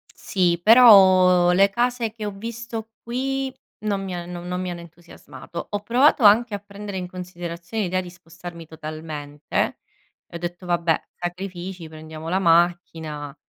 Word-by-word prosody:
sì, 175 -3 0
però 185 -6 +7
le 195 +2 +5
case 240 +1 0
che 220 -1 -7
ho 205 - -3
visto 230 +2 -7
qui 265 +2 -2 0.3
non 200 -2 -1
mi 190 -1 -5
ha 175 -1 -5
non 175 0 -7
non 180 0 -3
mi 185 - -3
hanno 175 -1 -7
entusiasmato. 170 0 -10
Ho 205 - -2
provato 255 +4 +3
anche 215 +2 +6
a 205 - -2
prendere 200 0 -8
in 180 -1 -4
considerazione 175 +2 -6
l'idea 185 0 -1
di 180 - -9
spostarmi 175 -1 -11
totalmente, 155 -2 -4 0.5
e - - -13
ho - - -2
detto: 175 +1 -6
"Vabbè, 170 -2 +1
sacrifici, 180 -1 -6
prendiamo 155 0 -10
la 185 - +1
macchina, 165 -4 +1
180 Hz, 155 wpm, -23 LUFS, 170-205 Hz, 0.5 s, però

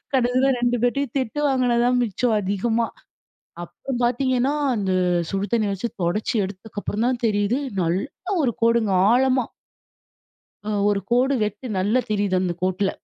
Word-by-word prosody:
கடைசில 255 +1 +2
2 245 0 +1
பேர்டயும் 270 +1 0
திட்டு 260 +3 -3
வாங்கினது 250 -3 +2
தான் 250 0 +2
மிச்சம் 230 +1 0
அதிகமா. 220 +4 0 0.8
அப்புறம் 245 +8 -6
பாத்தீங்கன்னா, 255 +2 +1 0.2
அந்த 195 -3 -1 0.4
சுடு 195 0 -1
தண்ணீ 220 -3 +2
வச்சு 195 +5 -3 0.2
தொடச்சி 205 +7 -1
எடுத்ததுக்கப்புறம் 205 +2 -5
தான் 250 -1 -1
தெரியுது. 205 +2 +1 0.3
நல்ல 195 - -2
ஒரு 250 - +2
கோடுங்க 230 -3 +3 0.2
ஆழமா 255 +1 +3 1.3
அ - - -1 0.2
ஒரு 205 -1 +1
கோடு 255 +3 +3
வச்சு 210 +3 -5
நல்லா 210 +7 +2
தெரியுது 200 -3 +1
அந்த 180 -2 -1
கோட்டுல. 185 +1 +1
230 Hz, 140 wpm, -23 LUFS, 205-250 Hz, 1.3 s, கோடுங்க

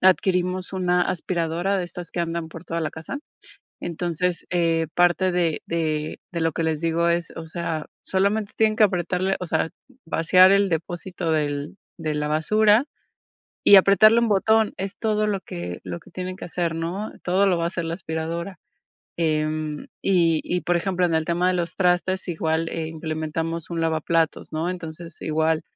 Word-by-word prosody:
adquirimos 185 0 +2
una 180 -1 +2
aspiradora 175 +2 -1
de - - -1
estas 175 -1 -9
que 175 - -2
andan 170 -1 -2
por 165 0 -10
toda 165 -1 -4
la 160 - -1
casa, 160 - -5 0.6
entonces, 175 +1 -2
eh, 165 -2 +1
parte 175 +1 +3
de 175 -3 0
de 155 -2 -2
de 170 - -2
lo 165 0 +2
que 165 +2 -2
les 160 -2 0
digo 165 +1 +1
es, 170 0 -1
o 165 - -6
sea, 160 -2 -3 0.2
solamente 200 +2 0
tienen 220 -1 +3
que 220 - +2
apretarle, 185 0 0
o 180 - -5
sea, 160 0 0 0.3
vaciar 185 +3 +5
el 200 0 +4
depósito 175 +1 -3
del 150 +2 -1 0.2
de 155 -3 -3
la 150 0 -1
basura 215 - +3 0.8
y 205 - +9
apretarle 200 +4 +7
un 235 - +1
botón, 220 +2 +3
es 195 +1 -5
todo 215 -1 +1
lo 200 -2 -1
que 90 - -6
lo 90 -2 -5
que - - -19
tienen 185 0 -5
que - - -7
hacer, 170 -1 -2
¿no?, 175 +6 -3
todo 185 +3 +3
lo 185 -3 +3
va 170 - -1
a - - +2
hacer 170 0 -3
la 165 0 -3
aspiradora, 170 +1 -4 0.6
em, 155 -2 -1 0.2
y 170 -4 +3
y 180 - -1
por 175 - +1
ejemplo, 180 +1 0
en 165 - 0
el 160 0 +2
tema 175 +2 +1
de 185 - +2
los 170 -1 -2
trastes, 185 +1 +1
igual, 160 -1 0
eh, 165 -1 -3
implementamos 160 +1 -4
un 170 -1 -2
lavaplatos, 165 0 0
¿no?, 160 +2 -1
entonces, 165 -2 -5
igual, 160 0 +1
170 Hz, 180 wpm, -24 LUFS, 160-185 Hz, 0.8 s, y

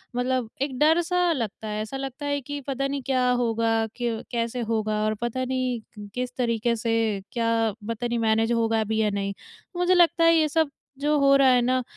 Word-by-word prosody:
मतलब 250 -1 0
एक 275 -2 -2
डर 320 +3 +5
सा 355 +1 +1
लगता 225 -7 -3
है 210 0 -3
ऐसा 220 +5 -5
लगता 270 +2 -6
है 285 0 0
कि 290 0 -4
पता 275 0 -1
नहीं 280 0 -3
क्या 255 -1 +2
होगा 230 -1 +1 0.3
क 230 -2 -2
कैसे 235 0 -2
होगा 215 -1 0
और 215 - +1
पता 240 +2 -2
नहीं 250 -5 -4
किस 250 0 -3
तरीक़े 235 -1 0
से 230 0 -1 0.4
क्या 230 -1 0 0.4
पता 230 +1 -2
नहीं 235 0 -1
मैनेज 225 0 +2
होगा 225 -1 +1
भी 220 +1 -2
या 215 - +2
नहीं? 200 -1 -2 0.4
मुझे 355 +1 +3
लगता 345 -1 +4
है 330 0 +6
ये 315 -1 +3
सब 320 0 +1 0.3
जो 295 +1 +2
हो 275 0 +5
रहा 275 -1 +5
है 250 -1 +4
ना 255 +1 +1
245 Hz, 205 wpm, -25 LUFS, 225-275 Hz, 0.4 s, है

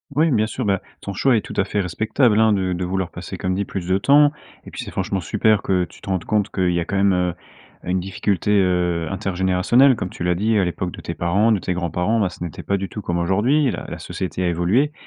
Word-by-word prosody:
Oui, 155 +1 +3
bien 110 -2 +2
sûr, 130 - -4
bah 100 -3 +1 0.2
ton 100 - -5
choix 125 +6 +2
est 110 - +2
tout - - -9
à 100 - +2
fait 105 -1 -1
respectable, 110 - +1
hein, 110 -1 +4
de 95 -2 0
de 90 0 -2
vouloir 95 -2 -2
passer, - - -7
comme 95 0 -1
dit 100 +2 -1
plus 90 -3 -5
de 95 +1 +2
temps 145 +6 +5 0.3
et - - -10
puis - - -6
c'est - - -8
franchement 95 - -2
super 105 +4 +2
que 90 -1 +1
tu - - -10
te - - -15
rendes 95 -3 -1
compte 105 -2 0
qu'il 90 -2 0
y 85 - 0
a 85 - -2
quand - - -4
même, 100 0 +3
heu, 90 -1 0 0.5
une 90 +1 0
difficulté, 95 +1 -1
heu, 90 -4 +2
intergénérationnelle 95 +7 +2
comme 90 - -3
tu 85 - -7
l'as 90 - +2
dit 110 +4 +1
à 100 - +3
l'époque 90 0 -3
de - - -10
tes 85 - -5
parents, 100 +7 +2
de 105 - +2
tes 90 - -2
grands-parents, 90 +5 0
bah 95 - +1
ce 90 - -14
n'était 85 -4 -6
pas 100 - 0
du 95 0 -4
tout 105 - -7
comme 85 -3 -2
aujourd'hui 115 - +2
la - - -4
la - - -6
société 95 0 -4
a - - +2
évolué 95 - +1
95 Hz, 265 wpm, -21 LUFS, 90-110 Hz, 0.5 s, temps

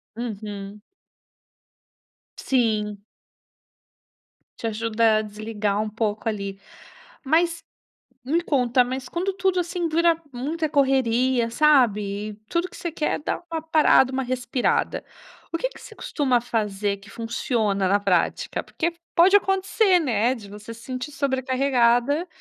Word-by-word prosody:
Uhum. 210 -3 -6 1.6
Sim. 215 -5 0 1.6
Te 230 - -3
ajuda 225 0 +2
a - - +1
desligar 210 -1 -2
um 215 - -3
pouco 215 0 -2
ali. 200 -2 -4 0.7
Mas, 335 +3 +2 0.6
me 325 +6 +1
conta, 250 -4 +3
mas 255 +1 -5
quando 370 +3 -2
tudo 375 -1 +1
assim 350 0 -1
dura 335 +1 +2
muita 310 +6 -2
correria, 260 -3 +2
sabe? 215 -8 +2 0.2
Tudo 350 +2 -1
que - - -14
você 340 - -4
quer 305 -1 -1
é - - -5
dar 300 - -3
uma 325 -1 -2
parada, 310 -5 +4
uma 265 0 -1
respirada. 250 0 -1 0.5
O - - +1
que - - -1
que - - -15
você 440 -3 -12
costuma 260 -5 0
fazer 205 -4 -1
que 200 +2 -16
funciona 225 -4 -1
na 200 +2 +3
prática? 190 -4 0
Porque 335 +1 -2 0.2
pode 370 +4 +6
acontecer, 385 0 +2
né, 245 -3 +1
de 205 -4 -11
você 210 +2 -9
se 230 - -14
sentir 255 +3 -5
sobrecarregada. 265 +2 +1
245 Hz, 130 wpm, -24 LUFS, 215-310 Hz, 1.6 s, pode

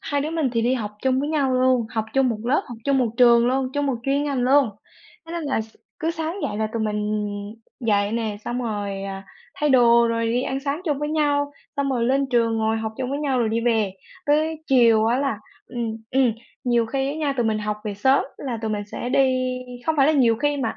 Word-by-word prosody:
hai 285 -1 -1
đứa 305 +3 -2
mình 320 -5 0
thì 230 -1 +1
đi 250 +2 +2
học 215 -4 -3
chung 260 0 +2
với 290 - -2
nhau 285 -4 +1
luôn, 255 -2 +3
học 220 -3 -1
chung 270 -1 +3
một 225 -3 -2
lớp, 265 +5 +2
học 240 - -8
chung 275 -1 +2
một 245 -3 +2
trường 235 -1 +6
luôn, 260 +1 +1
chung 290 0 0
một 270 - +1
chuyên 280 +3 +1
ngành 280 -3 -1
luôn. 270 -1 +4 0.6
Thế 330 - -8
nên 340 -1 -3
là 275 -6 0
s 220 0 -10 0.2
cứ 325 -1 -1
sáng 325 +1 -3
dậy 205 - -2
là 220 - 0
tụi 230 -1 -1
mình 210 -1 -1 0.8
dậy 205 -2 +1
nè, 220 -3 -2
xong 245 +1 -2
rồi, 205 -3 -3
à, 195 0 -6 0.3
thay 295 - 0
đồ 235 -2 +6
rồi 230 0 0
đi 240 +3 +1
ăn 265 +1 -2
sáng 285 +4 -2
chung 295 -4 0
với 295 0 -2
nhau, 290 -2 +1 0.2
xong 280 -1 0
rồi 240 -3 0
lên 275 +2 +2
trường 230 -2 +2
ngồi 220 0 +1
học 220 0 -3
chung 255 0 -2
với 285 - -2
nhau 275 -4 0
rồi 230 -2 +1
đi 225 +1 0
về. 220 -5 +1 0.3
Tới 310 +2 +2
chiều 230 -4 +5
á 240 +3 +2
là 275 -7 -1 0.3
ừm, 230 -2 -4
ừm, 255 -3 +3 0.3
nhiều 240 -2 +2
khi 270 +3 -1
á 285 - -3
nha, 295 -3 0
tụi 240 -2 +1
mình 215 -1 +1
học 210 0 -2
về 205 -1 -3
sớm 265 +7 +3
là 245 -5 -4
tụi 220 - -1
mình 205 -1 -2
sẽ 245 - -4
đi 255 -1 +1 0.3
không 320 -1 +1
phải 275 0 +5
là 310 - +4
nhiều 240 -6 +4
khi 290 +2 0
mà 240 -5 -2
250 Hz, 250 wpm, -23 LUFS, 225-280 Hz, 0.8 s, trường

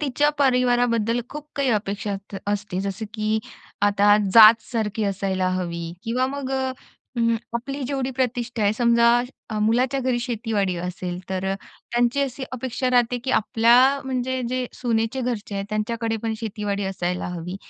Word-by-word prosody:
तिच्या 295 +1 +2
परिवाराबद्दल 245 -3 +2
खूप 300 0 -8
काही 280 -1 +1
अपेक्षा 205 -1 -1
अस 195 0 -7
असते. 205 -2 -3
जसं 195 +2 -3
की 215 0 0 0.4
आता 205 0 +5 0.2
जातसारखी 220 -1 +6
असायला 190 -2 0
हवी 170 -2 -4
किंवा 250 +3 0
मग 270 0 -4
अ, 265 -1 0 0.5
हं, 230 0 +3 0.2
आपली 275 +4 -3
जेवढी 270 0 -2
प्रतिष्ठा 245 -2 -1
आहे 205 0 +3
समजा, 235 0 +4 0.4
अ, 215 - -2
मुलाच्या 245 +5 +2
घरी 255 -1 0
शेतीवाडी 220 -6 -1
असेल 180 0 -4
तर 190 0 -1
त्यांची 240 +3 -1
अशी 270 -1 -2
अपेक्षा 255 0 -2
राहते 245 0 +2
की 265 - -1
आपल्या 230 +3 +4 0.3
म्हणजे 260 0 -2
जे 255 0 -1
सुनेचे 230 +1 -1
घरचे 235 -5 -3
आहेत 195 0 -2
त्यांच्याकडे 225 +1 -1
पण 225 -1 -1
शेतीवाडी 205 -2 -3
असायला 180 -2 -2
हवी. 180 +1 -5
230 Hz, 150 wpm, -23 LUFS, 205-250 Hz, 0.5 s, जातसारखी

